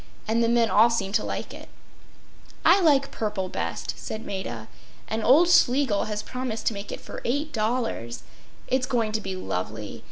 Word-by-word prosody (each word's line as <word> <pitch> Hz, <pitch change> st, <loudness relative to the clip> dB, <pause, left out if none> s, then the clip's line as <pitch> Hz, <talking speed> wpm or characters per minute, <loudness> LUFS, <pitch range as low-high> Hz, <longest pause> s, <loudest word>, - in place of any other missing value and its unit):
And 230 Hz, +2 st, +2 dB
the 230 Hz, -, +2 dB
men 235 Hz, -1 st, +3 dB
all 220 Hz, +3 st, +6 dB
seem 195 Hz, -4 st, -1 dB
to -, -, +1 dB
like -, -, -4 dB
it.” -, -, -11 dB, 1.0 s
“I 395 Hz, -, +6 dB
like 280 Hz, -5 st, +3 dB
purple 210 Hz, -4 st, -2 dB
best,” -, -, -3 dB
said 220 Hz, +1 st, -6 dB
Maida. 120 Hz, -, -5 dB, 0.4 s
“And 220 Hz, 0 st, -2 dB
old 305 Hz, +8 st, +6 dB
Schlegel 265 Hz, -9 st, +4 dB
has 210 Hz, 0 st, -3 dB
promised 250 Hz, -3 st, -4 dB
to -, -, +2 dB
make 200 Hz, 0 st, -7 dB
it -, -, -5 dB
for -, -, -8 dB
$8. 235 Hz, -, -2 dB, 0.5 s
It’s 260 Hz, 0 st, +1 dB
going 230 Hz, -3 st, 0 dB
to 215 Hz, 0 st, -1 dB
be 190 Hz, -2 st, -4 dB
lovely. 105 Hz, -, -4 dB
220 Hz, 170 wpm, -25 LUFS, 200-255 Hz, 1.0 s, all